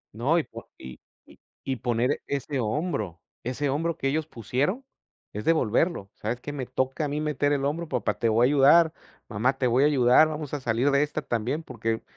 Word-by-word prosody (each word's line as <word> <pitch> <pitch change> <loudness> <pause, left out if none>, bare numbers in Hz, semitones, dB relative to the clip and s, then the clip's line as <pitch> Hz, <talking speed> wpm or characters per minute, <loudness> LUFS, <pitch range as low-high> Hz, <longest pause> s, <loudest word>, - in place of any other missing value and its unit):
No, 135 +9 +2
y 160 - +2
po - - -12
y 65 -1 -10 0.3
y - - -19 0.2
y 135 - -2
poner 120 +2 0
ese 140 0 -2
hombro. 110 - -2 0.2
Ese 130 +4 -2
hombro 165 +4 -1
que 135 - -2
ellos 155 +2 -1
pusieron, 145 - -2 0.5
es 105 +1 -5
devolverlo. 155 - +1
¿Sabes 115 +3 -4
qué? 145 +3 -7
Me 135 -3 -4
toca 130 +4 -1
a - - -1
mí 145 +1 -2
meter 150 -1 0
el 140 -1 0
hombro, 160 +3 -2
papá, - - 0
te 115 -2 +2
voy 115 +3 +4
a - - +5
ayudar. 150 +4 +5 0.3
Mamá, 125 +6 0
te 130 - 0
voy 125 +4 +3
a - - +6
ayudar, 130 +1 +5
vamos 150 -2 -6
a 145 - -1
salir 120 +4 +1
de 140 - +3
esta 150 +1 -3
también. 120 +7 -2
Porque, 115 -4 -3
135 Hz, 205 wpm, -26 LUFS, 120-150 Hz, 0.5 s, a